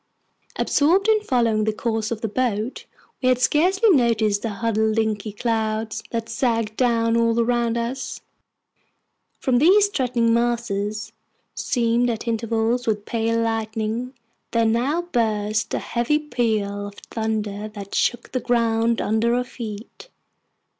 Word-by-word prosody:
Absorbed 355 +8 +2
in 435 -1 +4
following 235 - +1
the 220 - +2
course 225 0 -2
of 225 -2 -4
the 225 - -1
boat, 225 +1 -2 0.4
we 255 - +3
had 255 - +4
scarcely 370 - +3
noticed 225 - +2
the 230 - -2
huddled 220 +1 0
inky 215 -1 -1
clouds 220 0 -2
that 230 -1 -3
sagged 230 -2 -1
down 230 -2 +2
all 230 0 +2
around 235 0 +1
us. 235 +3 -4 1.2
From 250 -3 +2
these 400 +7 +5
threatening 245 - +1
masses, 220 -2 -1 0.4
seamed 240 -1 +1
at 230 0 -4
intervals 230 +1 0
with 210 -2 0
pale 230 0 0
lightning, 225 +2 -2 0.3
there 230 -1 +2
now 255 +10 +1
burst 220 -8 -1
a - - 0
heavy 240 +5 0
peal 215 -8 -1
of 205 - -11 0.2
thunder 215 -2 -2
that 200 -2 -9
shook 240 -1 0
the 255 - -1
ground 230 -1 +1
under 225 +2 +1
our 250 - +1
feet. 230 - -9
230 Hz, 135 wpm, -22 LUFS, 220-245 Hz, 1.2 s, these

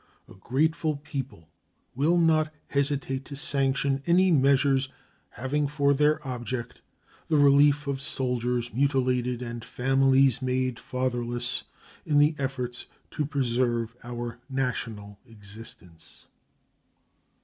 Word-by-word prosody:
A - - -14
grateful 155 - 0
people 135 - -7 0.5
will 155 +7 +2
not 160 -2 +3 0.2
hesitate 140 -1 0
to 140 - -8
sanction 135 -1 0
any 180 +2 +4
measures 135 -2 +3 0.4
having 145 +4 -1
for 140 0 +2
their 150 +1 +1
object 125 -1 -5 0.5
the 155 - +2
relief 145 +1 +5
of 140 -1 -3
soldiers 125 -3 -2
mutilated 125 -2 +1
and 120 -1 -6
families 135 0 +3
made 130 -1 -1
fatherless 120 -1 -2 0.4
in 150 - +1
the 145 +2 +5
efforts 125 -3 -3 0.2
to 150 - -2
preserve 120 -4 0
our 120 0 -6
national 115 -6 -3
existence. 100 -6 -13
130 Hz, 105 wpm, -27 LUFS, 120-140 Hz, 0.5 s, relief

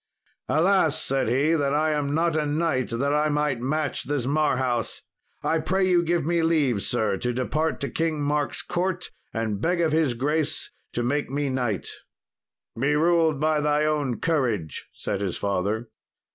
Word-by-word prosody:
"Alas," 170 -1 +3
said 135 -2 0
he, 140 +7 +2
"that 145 -3 +1
I 155 +1 +2
am 145 -1 0
not 165 0 +1
a 155 - +1
knight, 150 -3 0
that 140 +5 0
I 150 +1 +2
might 145 -4 0
match 150 +4 -1
this 145 -4 -1
Marhaus! 130 -5 0 0.4
I 165 - +1
pray 185 +4 +1
you 180 -2 +4
give 170 -2 0
me 170 +1 +1
leave, 150 -10 +2
sir, 110 -4 0
to 125 +5 -1
depart 150 +6 -1
to 140 - -1
King 160 -2 -1
Mark's 145 0 0
court 180 +1 -2 0.2
and 110 -3 -2
beg 175 +1 +1
of 165 -2 +2
his 155 -6 +2
grace 150 +5 -1 0.2
to 120 - -1
make 145 +4 0
me 140 +1 -1
knight." 120 -6 -1 0.9
"Be 145 +4 +2
ruled 160 -2 +3
by 155 0 +2
thy 150 0 +2
own 145 -5 0
courage," 120 - -1
said 100 -1 -4
his 95 -4 -2
father. 100 +4 -1
145 Hz, 170 wpm, -25 LUFS, 125-160 Hz, 0.9 s, you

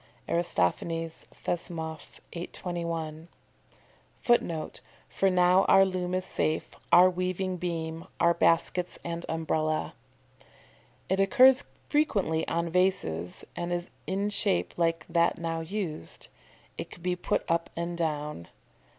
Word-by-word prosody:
Aristophanes, 165 - 0
Thesmoph., 160 -2 -5
821. 170 -2 -4 0.9
[Footnote: 170 -10 +1 0.3
"For 195 - +1
now 180 +1 +5
our 195 - +7
loom 185 -1 -2
is 185 0 -1
safe, 155 -4 -1 0.2
our 180 +1 +9
weaving 185 0 -1
beam, 165 -2 -4
our 170 0 +5
baskets 170 +1 +2
and 170 0 -4
umbrella."] 155 -1 -1 1.1
It 190 +1 +1
occurs 255 +7 +6 0.2
frequently 200 - +1
on 170 0 -1
vases, 90 - 0
and 175 0 -3
is 175 0 -2 0.2
in 200 +2 -1
shape 90 - +1
like 165 -1 0
that 170 0 +2
now 165 -1 -2
used. 165 - -5 0.5
It - - -5
could 170 - -13
be 180 0 +1
put 180 - -1
up 170 0 0
and 170 +1 -3
down. 150 - -3
170 Hz, 115 wpm, -28 LUFS, 160-185 Hz, 1.1 s, our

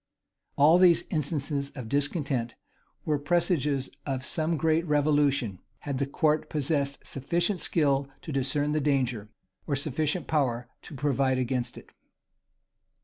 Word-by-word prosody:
[v] - - -61 0.6
All 160 +4 +7
these 175 -2 +6
instances 145 -2 -1
of 125 -5 -6
discontent 140 -3 -1 0.5
were 150 -2 +1
presages 145 -4 0
of 135 -2 -3
some 160 +2 -1
great 160 +2 +2
revolution, 145 -8 +2 0.2
had 140 -3 -3
the 140 - 0
court 150 +2 +1
possessed 140 -2 -1
sufficient 175 +7 -1
skill 140 -5 +1 0.2
to 160 - -6
discern 145 +2 0
the 155 0 +1
danger, 125 -7 0 0.4
or 145 - +1
sufficient 150 +4 -1
power 125 -6 0
to 150 - -10
provide 135 -1 +1
against 125 -1 -2
it. - - -13
145 Hz, 135 wpm, -28 LUFS, 135-155 Hz, 0.6 s, All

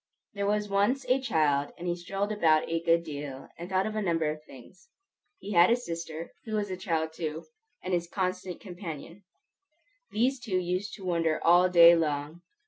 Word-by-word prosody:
There 200 0 -2
was 210 0 0
once 205 +7 +1
a 260 +1 +3
child, 145 - +1
and 175 - -6
he 175 - 0
strolled 195 +4 -3
about 160 -7 +3
a 165 0 -1
good 170 0 +3
deal, 145 -4 -7
and 175 +2 -7
thought 190 0 +1
of 215 - -3
a 215 - 0
number 165 -5 +1
of 155 0 -8
things. 175 - -16 0.5
He 205 - -8
had 175 -2 +6
a 235 - +5
sister, 165 -7 -6
who 220 -1 -3
was 205 -2 -1
a - - -2
child 165 -4 -2
too, 160 -1 -5 0.4
and 185 - -3
his 175 -1 0
constant 185 -1 -3
companion. 175 -1 -8 0.9
These 250 +5 +1
two 220 -6 -2
used 185 +3 -2
to 195 - -11
wonder 165 -3 +1
all 175 +2 +6
day 170 -1 +8
long. 150 0 -2
175 Hz, 190 wpm, -28 LUFS, 165-200 Hz, 0.9 s, day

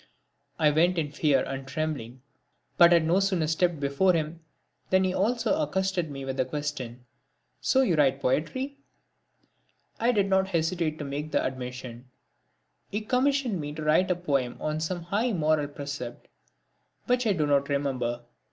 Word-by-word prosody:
I 150 -2 +4
went 175 +4 +3
in 150 -3 -1
fear 145 -3 +2
and 135 0 -5
trembling 135 -5 -4 0.5
but 170 0 +7
had 170 -2 +5
no 175 +4 +3
sooner 190 -5 +1
stepped 165 +1 +1
before 140 +7 +2
him 160 +1 -2 0.5
than 190 0 +4
he 185 -1 0
also 240 +10 +1
accosted 190 - -1
me 135 -1 -6
with 135 0 -4
the 130 - +3
question: 130 -5 -5 0.5
"So 265 - +3
you 195 - +2
write 140 -3 +3
poetry?" 260 - -1 1.2
I 235 +2 +3
did 200 -4 +2
not 190 0 +2
hesitate 165 -2 -1
to 150 - -5
make 145 +2 -4
the - - +1
admission. 125 -1 -6 0.8
He 210 - -2
commissioned 250 - +1
me 145 0 -5
to 155 0 -6
write 155 +5 +3
a 180 - +2
poem 140 -8 -1
on 155 0 -2
some 170 +2 -3
high 215 +7 0
moral 155 -3 +1
precept 140 -4 -7 0.8
which 250 -1 +1
I 210 - +3
do 155 -5 0
not 140 -1 +2
remember. 130 -4 -1
155 Hz, 160 wpm, -27 LUFS, 140-190 Hz, 1.2 s, but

